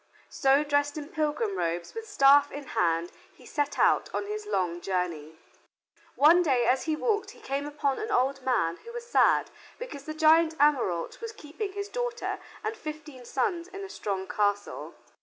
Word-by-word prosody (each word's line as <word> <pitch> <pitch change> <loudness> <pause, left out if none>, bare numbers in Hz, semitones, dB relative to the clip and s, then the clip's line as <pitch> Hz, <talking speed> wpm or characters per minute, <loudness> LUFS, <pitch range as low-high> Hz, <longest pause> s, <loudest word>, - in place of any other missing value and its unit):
So, 275 +2 +3
dressed 290 0 0
in 295 0 -6
pilgrim 315 +7 -1
robes, 170 - -2
with 450 0 -7
staff 285 -6 +5
in 290 - -6
hand 170 0 +1 0.2
he - - -18
set 290 -1 -2
out - - +3
on - - -1
his 420 0 -5
long 175 - -1
journey. 170 -5 -3 0.8
One 325 +5 +6
day 260 -8 +2
as 255 +3 +2
he 315 -1 0
walked 420 +4 0
he - - -16
came 280 +2 -3
upon 285 -2 -1
an 435 - -4
old 275 - +1
man 220 -11 +1
who 470 - -12
was 475 0 -6
sad 480 - +3 0.3
because 285 - -8
the 310 - -5
giant 320 +1 +4
Ameraunt 265 - +1
was 460 -1 -5
keeping 390 +1 -6
his 405 0 -4
daughter 485 +1 -3 0.2
and 440 - -2
fifteen 305 - -8
sons 350 - -1
in 390 +1 -8
a 390 - -7
strong 195 - -3
castle. 205 -1 -1
295 Hz, 175 wpm, -28 LUFS, 250-390 Hz, 0.8 s, One